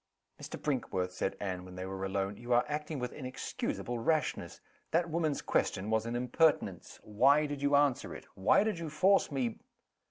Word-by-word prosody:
"Mr. - - -7
Brinkworth!" 95 -10 -1
said 90 +1 -2
Anne, 95 -3 -3
when 90 0 -11
they 90 0 -5
were 95 0 -5
alone, 95 +1 -1
"you 120 +3 -2
are 120 - +4
acting 150 +1 -3
with 125 -1 -4
inexcusable 125 -2 -4
rashness. 155 +7 -1 0.3
That 165 0 +1
woman's 155 -3 0
question 100 +4 0
was 110 +1 +1
an 120 - -2
impertinence. 125 +6 +1
Why 140 +8 +4
did 145 -1 -4
you 145 0 +3
answer 140 -3 +2
it? - - -10
Why 95 - +4
did 215 -5 -1
you 165 -2 -4
force 185 +5 +3
me 125 -5 -1
125 Hz, 180 wpm, -32 LUFS, 100-150 Hz, 0.3 s, are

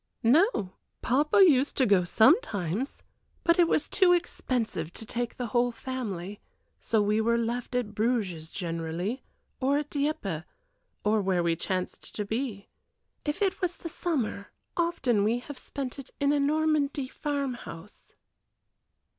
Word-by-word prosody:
"No. 240 - +3 0.3
Papa 295 +9 +4
used 275 -3 +3
to 260 - +4
go 200 -5 +4
sometimes, 220 - +2 0.4
but 335 +1 +3
it 345 - +6
was 305 - +1
too 360 -2 +4
expensive 240 - -1
to 225 - -7
take 240 +1 -3
the 250 - -2
whole 245 0 +3
family; 210 -7 -5 0.4
so 220 -2 +1
we 210 +2 +2
were 235 +1 +2
left 235 +2 -2
at 235 -4 -1
Bruges 205 -8 -1
generally, 170 +6 -3 0.4
or 275 +2 +2
at 295 0 -3
Dieppe, 280 - -1 0.6
or 210 0 +3
where 185 -3 +1
we 170 -1 +2
chanced 185 +2 -4
to 210 - -2
be. 220 -2 -3 0.6
If 295 +7 -1
it 390 0 0
was 360 -1 -1
the 335 - -6
summer, 260 - -2 0.3
often 270 - +1
we 225 +3 +2
have 260 +3 -8
spent 275 -1 -5
it 275 - -9
in 285 +1 +3
a 290 - +2
Normandy 290 -2 +1
farm 280 -1 -2
house." 170 -3 -11
245 Hz, 145 wpm, -28 LUFS, 205-290 Hz, 0.6 s, it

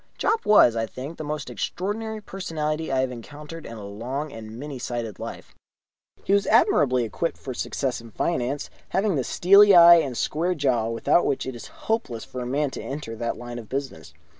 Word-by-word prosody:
Jopp 445 +1 0
was, 205 - +6
I 115 0 -1
think, 135 +8 -8
the - - -3
most 150 0 -4
extraordinary 205 - -4
personality 160 -6 -3
I 130 -1 +2
have 130 -1 -1
encountered 150 +7 -9
in 115 - -8
a 105 - -8
long 125 +9 -5
and 110 0 -9
many 140 0 -6
sided 120 -4 -4
life. - - -8 0.7
He - - +1
was 200 -1 +3
admirably 130 -3 +4
equipped 115 +9 -3
for 130 - -6
success 125 0 -2
in 115 - -12
finance, 135 +2 -2 0.2
having 195 +1 +1
the 135 - 0
steely 200 - +6
eye 170 0 +10
and 135 -7 -1
square 175 +4 0
jaw 130 -7 +1
without 115 +9 +2
which 140 - -1
it 130 -1 -5
is 120 - -9 0.2
hopeless 145 - -2
for 125 - -7
a 120 - -4
man 140 +2 0
to - - -6
enter 135 -5 -6
that 115 +1 -3
line 120 0 -7
of 110 - -11
business. 130 - -5
135 Hz, 195 wpm, -25 LUFS, 120-165 Hz, 0.7 s, eye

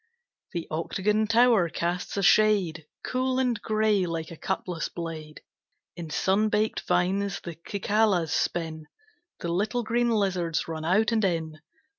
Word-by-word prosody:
The 170 -2 -4
octagon 210 +7 0
tower 230 -5 +4
casts 175 +4 -3
a 200 - 0
shade 185 -7 +3 0.2
Cool 255 0 0
and 250 -4 0
gray 215 -3 +1
like 165 -1 -4
a - - -7
cutlass 170 +1 -3
blade; 160 -3 -7 0.5
In 170 -2 -7
sun 190 +6 +1
baked 215 +1 0
vines 195 +1 +1
the 170 - -7 0.2
cicalas 200 -5 +1
spin, 160 -2 -2 0.5
The 170 - -3
little 215 +6 0
green 240 +2 +1
lizards 185 -7 0
run 160 -1 -5
out 210 +7 +3
and 220 -1 +1
in. 160 -4 -1
190 Hz, 140 wpm, -27 LUFS, 165-215 Hz, 0.5 s, tower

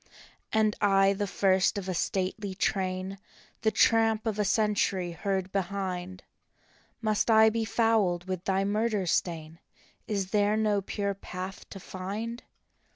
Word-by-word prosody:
" - - -32
And 215 -1 +2
I, 195 -1 +4
the 205 +1 -2
first 190 +1 +2
of 195 -2 -4
a 185 - -1
stately 190 +3 -2
train, 190 0 -1 0.4
The 220 - +3
tramp 225 0 +3
of 215 -2 -2
a - - +3
century 200 -4 +1
heard 190 +2 -2
behind, 185 -1 -3 0.8
Must 215 0 +1
I 220 0 +6
be 225 0 -1
fouled 205 -6 +1
with 185 -1 -3
thy 195 0 +1
murder 210 0 0
stain? 165 -2 -2 0.5
Is 195 -3 -2
there 210 0 +2
no 210 -2 +1
pure 200 +1 -2
path 190 0 -8
to 195 - -9
find? 205 +6 -5
195 Hz, 145 wpm, -28 LUFS, 185-215 Hz, 0.8 s, I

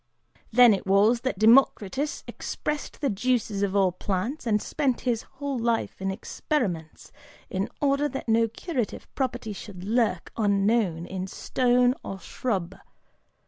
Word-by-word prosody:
Then 245 -1 +7
it 195 - -3
was 210 +5 +4
that 260 -6 -2
Democritus 235 +4 +3
expressed 300 -1 -5
the 280 - +1
juices 220 -1 0
of 200 -1 0
all 190 -2 +4
plants 205 - -3
and 210 -2 +3
spent 270 +1 -1
his 235 -3 0 0.2
whole 280 -2 -2
life 230 -4 -1
in 190 - -1
experiments, 190 - -3 0.4
in 190 +1 -1
order 285 +1 +2
that 270 -1 -6
no 225 0 +3
curative 245 - -4
property 245 -5 -2
should 190 -2 -9
lurk 215 -3 0
unknown 200 -4 +1
in 185 0 -4
stone 250 +4 +2
or 195 - -6
shrub. 190 -5 -3
225 Hz, 140 wpm, -26 LUFS, 195-255 Hz, 0.4 s, Then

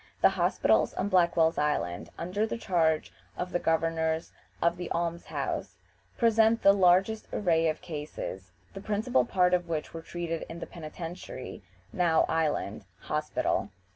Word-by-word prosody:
The - - +7
hospitals 175 - +2
on 195 - -1
Blackwell's 170 -3 +3
Island, 90 - -1
under 195 +6 -1
the 225 - -3
charge 165 -7 +1 0.2
of 180 0 -3
the 175 - 0
Governors 160 0 0 0.3
of 170 0 +2
the 175 -1 -5
Alms 170 0 -2
house, - - -3 0.4
present 225 -1 +4
the 200 - +8
largest 190 +3 +3
array 165 -4 +2
of 155 - -3
cases, 145 - -6 0.2
the 195 - -7
principal 220 +5 +1
part 180 -5 +2
of 175 -1 +1
which 155 -2 -3
were 165 - -6
treated 165 0 -4
in 165 - -7
the 170 - -5
Penitentiary 165 -3 -8 0.3
(now 170 -3 +3
Island) 145 -11 -1 0.2
Hospital. 150 -8 -1
170 Hz, 145 wpm, -29 LUFS, 160-185 Hz, 0.4 s, the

